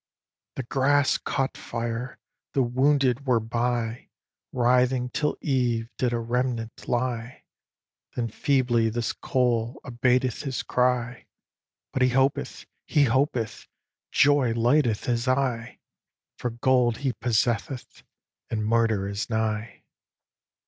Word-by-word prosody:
"The 135 - -3
grass 140 +2 +2
caught 135 -1 -2
fire; 115 +2 -4 0.4
the 135 - +4
wounded 135 +1 +2
were 125 -3 +4
by; 115 +1 -2 0.4
Writhing 125 0 +2
till 150 +3 -1
eve 120 -4 0
did 125 -2 +1
a 120 - 0
remnant 115 -1 -2
lie; 120 0 -2 0.7
Then 115 -2 -1
feebly 125 -3 +2
this 115 +1 -2
coal 120 -1 0
abateth 125 +1 +1
his 135 -3 -3
cry; 125 -1 0 0.7
But 130 - -1
he 125 - +5
hopeth! 135 +2 0 0.2
he 145 - +3
hopeth! 120 -3 0 0.4
joy 140 -5 +4
lighteth 120 -1 +2
his 120 0 -1
eye, 130 -3 0 0.6
For 125 - -1
gold 120 -1 +2
he 130 - +1
possesseth, 120 +2 -1 0.5
and 110 -2 -2
Murder 110 -3 +2
is 100 +4 -4
nigh!" 110 0 -2
125 Hz, 115 wpm, -26 LUFS, 115-130 Hz, 0.7 s, he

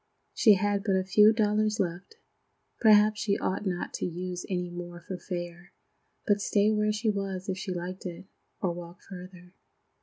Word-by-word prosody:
She 215 -4 +6
had 200 +1 0
but 200 -3 +1
a 190 - +1
few 210 +3 +6
dollars 215 -1 +1
left. 180 - -3 0.6
Perhaps 215 -1 +5
she 205 -2 +1
ought 190 +2 -2
not 180 -1 -3
to - - -3
use 180 +1 -5
any 180 -2 -1
more 175 0 -7
for 180 +1 -7
fare, 175 -1 -7 0.5
but 205 -1 +2
stay 205 +1 +2
where 210 0 +2
she 215 +1 0
was 195 -1 -4
if 190 -1 -2
she 190 - -4
liked 180 +1 -5
it, 175 +2 -8 0.4
or 180 -3 0
walk 175 0 -10
farther. 180 -1 -11
190 Hz, 175 wpm, -28 LUFS, 180-210 Hz, 0.6 s, She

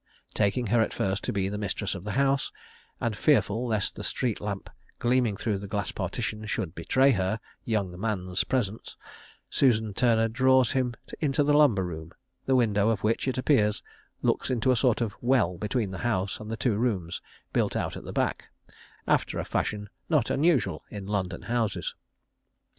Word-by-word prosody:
Taking 105 +4 +1
her 120 - +5
at - - 0
first 95 +1 -1
to - - 0
be 95 -2 0
the 105 +1 -3
mistress 100 0 -2
of, 95 -2 -7
the 105 0 -4
house, 135 0 +2 0.5
and 115 -2 -1
fearful 125 -3 +2
lest 110 -3 0
the - - -7
street 120 -5 -1
lamp 100 -2 -4 0.3
gleaming 120 -4 +2
through 105 -2 -1
the 100 - -7
glass 100 0 -2
partition 110 +3 -3
should 90 -6 -2
betray 135 +7 +3
her 95 -1 0 0.3
"young 100 -6 -1
man's" 95 -4 -1
presence, 115 -5 -2 0.5
Susan 110 -5 +3
Turner 115 0 +3
draws 130 +2 +4
him 125 -2 0 0.2
to 145 -1 +2
the 145 +1 +3
lumber 140 -10 +5
room, 80 -1 -7 0.3
the 135 - +4
window 105 -4 +3
of 110 -3 0
which, 115 +5 +1
it 130 - 0
appears, 115 -6 +2 0.4
looks - - +1
into 130 0 +2
a - - +4
sort 120 -1 +2
of 110 -4 -1
well 115 -9 +2
between 105 -1 -1
the 95 - -6
house 100 -4 -1
and 110 - -8
the 115 - -3
two 110 -1 +1
rooms 95 -8 -1 0.3
built - - +1
out - - -1
at - - -7
the - - -7
back, - - -1 0.6
after - - +1
a - - -2
fashion 105 -1 -2 0.2
not 150 -8 +2
unusual 135 - +2
in 100 -2 -7
London 95 -3 -2
houses. 115 +1 -1
110 Hz, 180 wpm, -27 LUFS, 100-125 Hz, 0.6 s, her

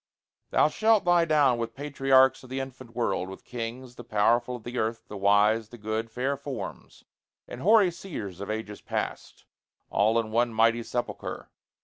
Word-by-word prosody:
Thou - - +4
shalt 215 +5 +2
lie 175 -1 +4
down 145 -6 +3
With 115 0 -4
patriarchs 135 -2 +3
of 130 - -13
the 130 +1 -3
infant 130 -3 -8
world 105 -6 -1
with 95 - -11
kings, 120 +1 -6
The 120 - -8
powerful 120 +3 +1
of 120 - -10
the 120 +2 -4
earth 115 +1 -2
the 105 - -8
wise, 105 +2 +3
the 120 - -11
good, 110 +1 -3
Fair 130 +4 -1
forms, 140 -1 -8 0.4
and 120 - -8
hoary 205 0 +5
seers 110 - -7
of 100 - -6
ages 110 -1 -5
past, - - -5 0.5
All 110 +3 +3
in 110 -1 -3
one 120 +1 +2
mighty 115 +1 +3
sepulchre. 120 +1 -5
120 Hz, 170 wpm, -27 LUFS, 110-135 Hz, 0.5 s, hoary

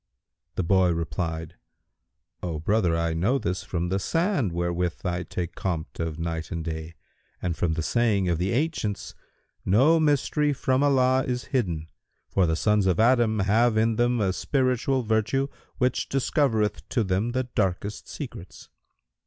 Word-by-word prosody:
The 95 - 0
boy 95 +1 +3
replied, 80 +1 -3 0.8
"O 85 -3 -3
brother, 85 0 +1
I 85 0 0
know 95 +12 +1
this 90 -8 -2
from 85 -1 -3
the 95 - +1
sand[FN#170] 165 - 0
wherewith 85 0 -1
I 90 0 -1
take 90 -1 -4
compt 85 -4 -4
of 80 -2 -2
night 85 -1 -3
and 85 -3 -4
day 80 0 -5 0.4
and 90 -2 -2
from 85 -2 0
the 80 0 -2
saying 105 -2 +1
of 85 -2 0
the 95 +2 0
ancients, 125 -7 -2 0.5
'No 135 - +4
mystery 150 0 +2
from 130 0 +1
Allah 130 -2 +3
is 125 -1 -2
hidden; 85 - 0 0.4
for 95 -3 +2
the 80 - +1
sons 105 +2 +2
of 90 -3 +2
Adam 115 -1 +4
have 110 +4 +3
in 110 +1 +2
them 120 0 +2
a 95 -3 +1
spiritual 130 +1 0
virtue 115 +5 +1 0.3
which 125 0 0
discovereth 130 -5 0
to 115 - +1
them 100 +5 0
the 130 0 +1
darkest 105 -4 -2
secrets.'" 120 - -9
100 Hz, 155 wpm, -26 LUFS, 85-125 Hz, 0.8 s, No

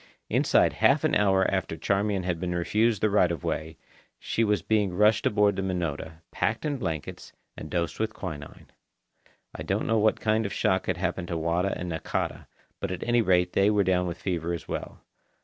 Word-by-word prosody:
Inside - - +3
half - - +4
an - - +1
hour 95 -2 +3
after 95 -4 -2
Charmian 100 0 0
had 90 -2 -2
been 90 0 -2
refused 105 +5 +1
the 110 - +4
right 90 -4 +3
of 85 -5 -4
way, 80 +1 -3 0.4
she 115 - -1
was 105 -5 +1
being 105 -4 +1
rushed 105 +3 +4
aboard 105 -1 +3
the - - -2
Minota, 85 -4 -3
packed - - -1
in 145 -2 -1
blankets, 80 - -5 0.2
and 80 - -8
dosed 85 0 -2
with 110 0 0
quinine. 80 -9 -8 0.8
I - - -8
don't - - -1
know 115 -1 +2
what 110 +1 +2
kind 110 -1 +1
of 100 - -7
shock 95 0 +1
had 90 - 0
happened 90 0 -2
to 85 - -2
Wada 85 +4 0
and 90 - -5
Nakata, 80 - -3 0.3
but - - -3
at 90 - -4
any 120 0 +3
rate 90 -4 +2
they 100 +1 +4
were 105 -1 +3
down 90 -1 +1
with 85 0 -5
fever 85 -2 -2
as 85 - -6
well. - - -6
95 Hz, 200 wpm, -27 LUFS, 85-105 Hz, 0.8 s, half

